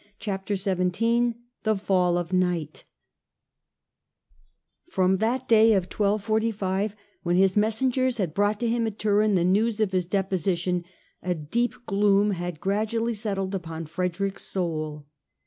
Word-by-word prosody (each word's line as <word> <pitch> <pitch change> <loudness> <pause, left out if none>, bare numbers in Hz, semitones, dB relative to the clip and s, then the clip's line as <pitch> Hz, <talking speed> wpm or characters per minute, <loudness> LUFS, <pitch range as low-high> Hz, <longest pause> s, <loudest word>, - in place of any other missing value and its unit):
Chapter 200 -1 -3
XVII 205 +5 +1 0.3
THE 220 -1 +1
FALL 180 -3 +2
OF 175 +1 -3
NIGHT 175 -4 -1 2.0
FROM 190 - +2
that 240 +5 -1
day 225 0 +6
of 195 -3 +2
1245 210 -1 0 0.3
when 175 0 0
his 190 0 +4
messengers 250 +4 +1
had 180 -7 -1
brought 205 +3 +1
to 240 - +1
him 230 0 +1
at 215 -1 -5
Turin 210 -1 +2
the 175 - +2
news 210 +5 +2
of 215 -3 +1
his 180 -2 0
deposi 190 -2 0
tion, 180 0 -1 0.4
a 180 -1 -1
deep 225 +11 -1
gloom 200 0 +3
had 175 -3 -4
gradually 220 +4 0
settled 200 -3 -2
upon 165 -3 -5
Frederick's 180 +4 -3
soul. 155 -5 -3
195 Hz, 135 wpm, -26 LUFS, 180-220 Hz, 2.0 s, day